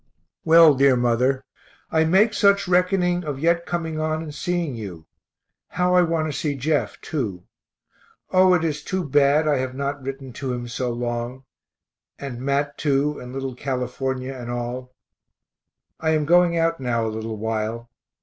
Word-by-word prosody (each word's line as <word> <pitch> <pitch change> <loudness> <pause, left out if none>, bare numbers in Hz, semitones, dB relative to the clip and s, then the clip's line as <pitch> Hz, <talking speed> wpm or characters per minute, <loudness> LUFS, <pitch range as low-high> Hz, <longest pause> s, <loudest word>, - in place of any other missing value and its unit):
Well, 165 -1 +7
dear 135 -1 +4
mother, 125 +2 +1 0.5
I 160 0 +3
make 195 +7 +4
such 200 -2 +3
reckoning 180 0 +2
of 145 -4 -4
yet 170 +3 +1
coming 160 -2 -3
on 155 0 -1
and 150 -2 -8
seeing 170 -1 -2
you. 95 -8 -8 0.6
How 180 0 0
I 180 - +6
want 165 -2 0
to 150 - -4
see 145 -2 -1
Jeff, 145 +3 -1
too 105 - -4 0.9
O, 185 0 +5
it 170 - 0
is 150 -2 -1
too 190 -1 -2
bad 145 +1 +3
I 145 -2 +3
have 130 0 -3
not 140 +1 -3
written 135 -1 -7
to 130 0 -4
him 120 -1 -5
so 125 +1 -3
long 120 +2 -4 0.7
and 130 -4 -7
Mat, 140 +1 -1
too, 145 0 +1
and 125 - -9
little 135 0 -4
California 130 0 -3
and 120 -2 -8
all. 120 +1 -4 1.1
I 160 0 +1
am 150 -1 0
going 175 +1 +4
out 165 0 +1
now 120 -3 -1
a 110 - -3
little 110 0 -5
while. 110 +2 -3
140 Hz, 165 wpm, -23 LUFS, 125-165 Hz, 1.1 s, Well